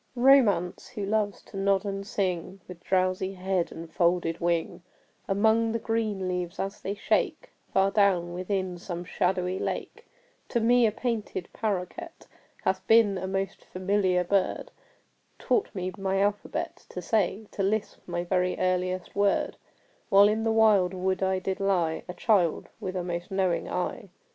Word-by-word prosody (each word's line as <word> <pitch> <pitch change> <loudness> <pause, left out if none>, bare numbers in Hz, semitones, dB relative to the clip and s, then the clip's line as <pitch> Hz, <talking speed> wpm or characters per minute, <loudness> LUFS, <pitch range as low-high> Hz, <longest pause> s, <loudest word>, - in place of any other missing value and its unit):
Romance, 240 -9 +4
who 210 -5 -5
loves 205 -1 -1
to - - -14
nod 195 0 +2
and 195 0 -4
sing, 185 -1 -2
With 175 -1 -11
drowsy 185 +1 0
head 185 -1 -1
and 165 +1 -8
folded 170 -2 +1
wing, 170 +1 0 0.5
Among 220 +3 +3
the - - +1
green 220 -4 -1
leaves 180 -1 -3
as 195 +1 -4
they 200 - -3
shake - - 0 0.2
Far 195 +1 +3
down 185 -5 +2
within 185 0 -2
some 175 -1 -6
shadowy 185 0 0
lake, - - -4 0.4
To 240 - +1
me 240 +1 +4
a - - +1
painted 220 -5 -3
paroquet 215 - -3 0.5
Hath 190 0 -1
been 220 -4 +5
a 190 - -4
most 195 0 -3
familiar 185 -1 +1
bird 190 +1 0 0.7
Taught 420 - +1
me 185 -1 -2
my 195 -1 -1
alphabet 205 +1 -2
to - - -6
say 215 0 0
To - - -4
lisp 205 +2 -1
my 175 0 -2
very 180 0 0
earliest 185 0 -1
word 200 0 +1 0.5
While 200 +1 +7
in 215 +1 0
the 225 - +2
wild 210 -5 +4
wood 185 +1 -1
I 190 0 +2
did 190 +1 -3
lie, 180 -5 +1
A 180 - -5
child 180 -5 +2
with 190 -4 -4
a 180 - -1
most 175 0 -4
knowing 190 -2 0
eye. 180 +2 -3
190 Hz, 160 wpm, -27 LUFS, 180-205 Hz, 0.7 s, While